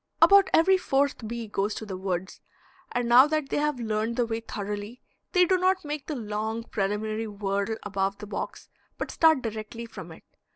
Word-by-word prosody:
About 400 Hz, 0 st, +7 dB
every 375 Hz, +3 st, +5 dB
fourth 275 Hz, -7 st, 0 dB
bee 235 Hz, 0 st, -5 dB
goes 205 Hz, 0 st, -1 dB
to 220 Hz, -, -6 dB
the 195 Hz, -3 st, -5 dB
woods, 185 Hz, -1 st, -4 dB, 0.5 s
and 245 Hz, -1 st, -1 dB
now 250 Hz, +4 st, +8 dB
that 305 Hz, -2 st, -1 dB
they -, -, -1 dB
have 295 Hz, -3 st, 0 dB
learned 220 Hz, 0 st, -1 dB
the 245 Hz, -1 st, +1 dB
way 225 Hz, 0 st, -2 dB
thoroughly 210 Hz, +1 st, -6 dB, 0.3 s
they 360 Hz, -1 st, +5 dB
do 370 Hz, +1 st, +2 dB
not 370 Hz, -1 st, +2 dB
make 295 Hz, -1 st, -5 dB
the 305 Hz, -, -3 dB
long 220 Hz, 0 st, -3 dB
preliminary 215 Hz, +1 st, -2 dB
whirl 200 Hz, +1 st, -2 dB
above 195 Hz, -1 st, -1 dB
the 210 Hz, -, -8 dB
box, 210 Hz, -, -6 dB, 0.3 s
but -, -, -4 dB
start 315 Hz, -5 st, +4 dB
directly 225 Hz, +1 st, -5 dB
from 230 Hz, -, -10 dB
it. -, -, -13 dB
225 Hz, 190 wpm, -27 LUFS, 210-280 Hz, 0.5 s, now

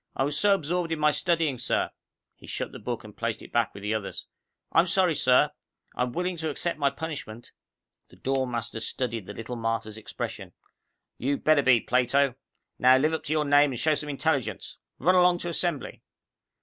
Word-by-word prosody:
I -, -, +1 dB
was 145 Hz, +1 st, -1 dB
so 200 Hz, +6 st, +4 dB
absorbed 170 Hz, 0 st, -2 dB
in 165 Hz, -, 0 dB
my 150 Hz, 0 st, +3 dB
studying, 160 Hz, -5 st, 0 dB
sir 120 Hz, -, 0 dB, 0.2 s
" -, -, -58 dB
He -, -, -14 dB
shut -, -, -4 dB
the -, -, -9 dB
book -, -, -4 dB
and -, -, -12 dB
placed -, -, -3 dB
it -, -, -13 dB
back -, -, +1 dB
with 100 Hz, -, -9 dB
the 105 Hz, +1 st, -1 dB
others. 110 Hz, -3 st, -4 dB, 0.5 s
"I'm 165 Hz, +2 st, +4 dB
sorry, 180 Hz, -1 st, +3 dB
sir. 125 Hz, -3 st, +4 dB, 0.4 s
I'm 125 Hz, 0 st, -1 dB
willing 180 Hz, +4 st, -2 dB
to 160 Hz, -1 st, -2 dB
accept 160 Hz, +2 st, -1 dB
my 140 Hz, -1 st, +3 dB
punishment." 140 Hz, -6 st, -7 dB, 0.6 s
The -, -, -17 dB
dorm 135 Hz, -1 st, -1 dB
master 115 Hz, -1 st, -3 dB
studied 115 Hz, -3 st, -3 dB
the 100 Hz, -, -6 dB
little 115 Hz, +2 st, -6 dB
martyr's 115 Hz, -1 st, -2 dB
expression. 110 Hz, -, -6 dB, 0.7 s
"You'd 140 Hz, +4 st, -1 dB
better 155 Hz, -2 st, +5 dB
be, 130 Hz, -4 st, +4 dB
Plato. 130 Hz, +2 st, +2 dB, 0.5 s
Now 130 Hz, +1 st, +6 dB
live 155 Hz, +4 st, +2 dB
up 160 Hz, -, -2 dB
to 155 Hz, -, -1 dB
your 155 Hz, -1 st, +1 dB
name 145 Hz, -1 st, +4 dB
and 120 Hz, -, -5 dB
show 155 Hz, 0 st, +3 dB
some 150 Hz, 0 st, -3 dB
intelligence. 140 Hz, -6 st, -2 dB, 0.2 s
Run 180 Hz, +6 st, +3 dB
along 180 Hz, -1 st, +5 dB
to 175 Hz, -, -4 dB
Assembly." 170 Hz, -3 st, -2 dB
140 Hz, 200 wpm, -27 LUFS, 125-160 Hz, 0.7 s, Now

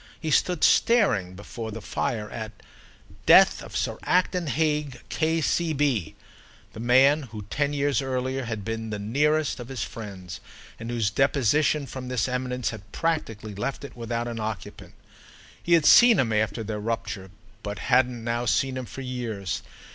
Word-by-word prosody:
He 160 Hz, -, -3 dB
stood 180 Hz, +1 st, +2 dB
staring, 105 Hz, -, +3 dB
before 110 Hz, +3 st, -7 dB
the 110 Hz, +1 st, -6 dB
fire, 110 Hz, 0 st, -3 dB
at 110 Hz, -1 st, -7 dB
the -, -, -23 dB, 0.6 s
"Death -, -, +7 dB
of -, -, -6 dB
Sir -, -, -2 dB
Acton 180 Hz, -1 st, +1 dB
Hague, 150 Hz, -1 st, 0 dB
K.C.B.," 155 Hz, -, 0 dB, 0.6 s
the -, -, -9 dB
man 130 Hz, +6 st, +5 dB
who 105 Hz, -2 st, -7 dB
ten 145 Hz, 0 st, 0 dB
years 145 Hz, 0 st, +1 dB
earlier 130 Hz, 0 st, -2 dB
had 110 Hz, -3 st, -5 dB
been 110 Hz, 0 st, -4 dB
the 105 Hz, -, -3 dB
nearest 145 Hz, +8 st, +1 dB
of 120 Hz, -, -7 dB
his 130 Hz, -5 st, -4 dB
friends 95 Hz, -6 st, -8 dB, 0.4 s
and 115 Hz, -, -6 dB
whose 115 Hz, -4 st, 0 dB
deposition 140 Hz, +4 st, +2 dB
from 130 Hz, 0 st, -7 dB
this 125 Hz, -1 st, 0 dB
eminence 125 Hz, -1 st, -2 dB
had 110 Hz, -3 st, -11 dB
practically 115 Hz, -10 st, -2 dB
left 105 Hz, +9 st, -4 dB
it 140 Hz, -, -9 dB
without 120 Hz, 0 st, -3 dB
an 115 Hz, -1 st, -5 dB
occupant. 110 Hz, -2 st, -6 dB, 0.7 s
He 170 Hz, -, +1 dB
had 165 Hz, -3 st, +5 dB
seen 240 Hz, -3 st, +8 dB
him 115 Hz, -7 st, +1 dB
after 110 Hz, +1 st, 0 dB
their 105 Hz, 0 st, -4 dB
rupture, 105 Hz, -3 st, -4 dB, 0.3 s
but 105 Hz, -1 st, -5 dB
hadn't 125 Hz, -2 st, +1 dB
now 120 Hz, +1 st, -1 dB
seen 130 Hz, +3 st, +1 dB
him 130 Hz, -, -4 dB
for 135 Hz, -, -8 dB
years. 120 Hz, -7 st, -4 dB
125 Hz, 160 wpm, -25 LUFS, 110-145 Hz, 0.7 s, seen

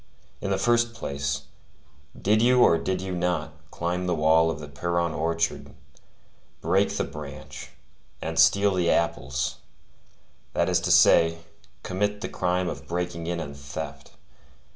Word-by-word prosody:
In -, -, -3 dB
the 95 Hz, -, +1 dB
first 120 Hz, +3 st, +2 dB
place, 70 Hz, -6 st, -3 dB, 0.8 s
did 105 Hz, +2 st, +2 dB
you 125 Hz, +1 st, +5 dB
or 85 Hz, -, +5 dB
did 95 Hz, -1 st, -2 dB
you 95 Hz, 0 st, -4 dB
not 85 Hz, -3 st, -1 dB, 0.2 s
climb 90 Hz, +3 st, -2 dB
the 90 Hz, -, +1 dB
wall 80 Hz, +1 st, +4 dB
of 80 Hz, -, -3 dB
the 75 Hz, -, -8 dB
Pierron 85 Hz, +3 st, -1 dB
orchard, 80 Hz, +1 st, -2 dB, 0.8 s
break -, -, +1 dB
the -, -, +1 dB
branch, 70 Hz, -3 st, -9 dB, 0.5 s
and 80 Hz, 0 st, -3 dB
steal 100 Hz, +5 st, +5 dB
the 90 Hz, -2 st, +1 dB
apples; 70 Hz, -5 st, 0 dB, 1.0 s
that -, -, +2 dB
is -, -, +3 dB
to -, -, -1 dB
say, 85 Hz, 0 st, +5 dB, 0.4 s
commit 105 Hz, +2 st, -1 dB
the -, -, -3 dB
crime 90 Hz, 0 st, 0 dB
of -, -, -6 dB
breaking 85 Hz, -1 st, -3 dB
in 85 Hz, 0 st, -2 dB
and 70 Hz, -4 st, -6 dB
theft? 70 Hz, 0 st, -8 dB
85 Hz, 145 wpm, -26 LUFS, 80-90 Hz, 1.0 s, you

